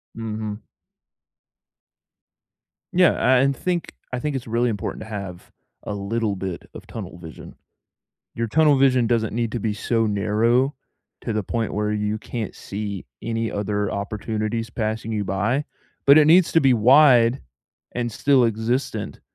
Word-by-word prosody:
Mhm. 110 -1 -5 2.3
Yeah, 155 -7 +4
a - - +4
and 135 -1 +1
think 180 -2 -2 0.2
I 125 - -1
think 145 +2 -2
it's 125 -2 -5
really 120 +2 +1
important 105 -4 -4
to 110 - -9
have 95 -4 -7 0.3
a 105 - -4
little 100 +1 -2
bit 95 -2 -5
of - - -10
tunnel - - -8
vision. 80 -2 -11 0.8
Your 115 0 -2
tunnel 150 +1 +4
vision 130 -3 +4
doesn't 110 -2 0
need 115 -2 -1
to 120 - -2
be 105 0 -1
so 115 +2 0
narrow 115 +7 +1 0.5
to 115 - -3
the 105 -1 -1
point 115 +2 -3
where 105 0 -1
you 105 +1 -1
can't 115 -1 -5
see 100 -2 -5 0.2
any 115 0 -2
other 105 0 -2
opportunities 110 +3 -3
passing 110 0 -3
you 105 -1 -1
by, 110 +10 0 0.4
but 140 - +8
it 155 -1 +7
needs 170 +2 +6
to 165 - +5
be 135 -3 +4
wide 125 0 +5 0.5
and 120 -1 -2
still 135 +3 +3
existent 115 +4 -2
115 Hz, 150 wpm, -23 LUFS, 105-125 Hz, 2.3 s, but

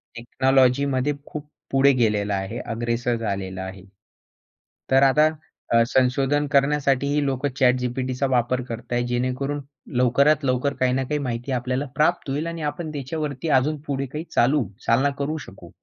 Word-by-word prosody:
टेक्नॉलॉजीमध्ये 130 +3 +2
खूप 150 -1 -8 0.2
पुढे 135 +1 +5
गेलेलं 105 -4 +1
आहे. 100 +4 -3
अग्रेसर 120 +1 -2
झालेलं 95 -4 -4
आहे. 95 0 -8 1.1
तर 135 +1 +5
आता 150 +3 +5 0.5
अ, 115 0 +6
संशोधन 135 +3 +2
करण्यासाठी 140 -1 +2
ही 150 0 +1
लोक 135 0 -1
ChatGPTचा 125 +1 +1
वापर 125 0 +1
करता 120 0 -5
आहेत. 120 0 0
जेणेकरून 130 +4 -2 0.4
लवकरात 140 +5 +3
लवकर 130 +2 +1
काही 125 -1 +2
ना 135 +1 0
काही 150 +3 -2
माहिती 125 -1 -4
आपल्याला 130 +2 -1
प्राप्त 155 +1 +1
होईल 145 +4 -2
आणि 170 -1 -5
आपण 155 +1 -6
त्याच्यावरती 145 +1 -4
अजून 150 +4 -1
पुढे 140 -1 -1
काही 150 +5 -6
चालू 135 +3 +3 0.2
चालना 130 +5 +3
करू 150 +3 -1
शकू. 90 -3 -13
130 Hz, 150 wpm, -23 LUFS, 120-140 Hz, 1.1 s, अ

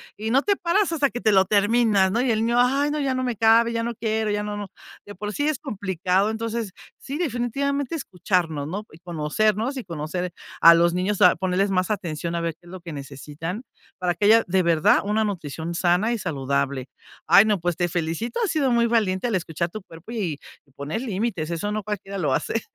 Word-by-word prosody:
"Y 220 +1 -4
no 270 +4 +3
te 405 - +2
paras 370 +2 +1
hasta 290 -4 +2
que 240 - -5
te 215 - +3
lo 190 -1 +5
terminas", 205 -1 +3
¿no? 235 +4 +1
Y 260 - 0
el 225 0 +1
niño: 240 +1 +2
"Ay, 275 +4 +2
no, 300 - -2
ya 270 -2 0
no 255 - -1
me 245 -2 -1
cabe, 230 +2 +4
ya 230 - -1
no 235 0 -3
quiero, 220 -1 -1
ya 205 0 -1
no, 210 0 -4
no". 205 -1 -5 0.4
De 205 - -9
por 210 +2 -5
sí 290 +1 -1
es 305 -4 0
complicado, 190 0 -1
entonces, 225 -2 -3 0.3
sí, 280 +2 -6
definitivamente 280 0 -1
escucharnos, 175 - -1
¿no? 200 +6 -5
Y 155 - -15
conocernos 205 - -1
y 260 - -5
conocer 170 +1 -4 0.3
a 170 0 +9
los 170 +1 +3
niños, 185 +3 -1
a 180 - +7
ponerles 190 +1 0
más 185 -1 +1
atención, 170 -4 -3
a 170 - -1
ver 165 -1 -2
qué 175 - -22
es 175 - -12
lo 185 - -8
que 170 -3 -8
necesitan 150 - -7 0.3
para 180 -1 0
que 175 +4 -1
haya 225 +2 +6
de 185 +1 +2
verdad 165 -3 +4
una 210 +2 +1
nutrición 165 -4 -4
sana 180 +7 +2
y 230 - -2
saludable. 160 -9 -4 0.8
Ay, 200 +2 +7
no, 210 -4 +1
pues 175 0 -2
te 175 -1 +1
felicito, 175 - -3
has 415 - 0
sido 285 -5 +1
muy 235 0 +3
valiente 220 -3 +1
al 225 - 0
escuchar 170 -1 -2
tu 215 +3 -7
cuerpo 165 +4 -13
y 180 -11 -3 0.4
poner 145 +10 -4
límites 200 -8 -2
eso 205 +5 -2
no 215 -1 -3
cualquiera 200 -1 -5
lo 150 -8 0
hace, 225 - -1
205 Hz, 220 wpm, -24 LUFS, 175-230 Hz, 0.8 s, a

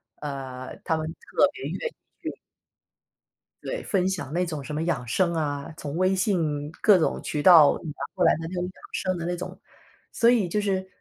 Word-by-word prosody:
啊， 130 -3 -6 0.2
他 160 - +1
们 155 - -3
特 165 - +1
别 390 - -9
愿 - - -3 0.2
意 - - -25 0.3
去。 - - -4 1.3
对， - - -4
分 185 -3 +1
享 180 -7 -3
那 180 +1 +1
种 155 -4 -5
什 150 - -6
么 155 +2 -1
养 150 -8 -1
生 170 +7 +1
啊， 145 -1 -2
从 145 +2 -5
微 185 +1 +3
信 160 -7 0
各 210 -3 +7
种 - - +1
渠 150 - -2
道 160 -4 +8
拿 155 - -5 0.2
过 - - 0
来 - - +6
的 - - -7
那 180 - -7
种 180 - -1
养 180 - -4 0.2
生 185 -1 -1
的 170 - -4
那 175 +1 -1
种。 180 - -7 0.5
所 235 0 +4
以 230 -6 +3
就 210 +5 0
是， 190 -2 -1
170 Hz, 220 characters per minute, -26 LUFS, 150-185 Hz, 1.3 s, 道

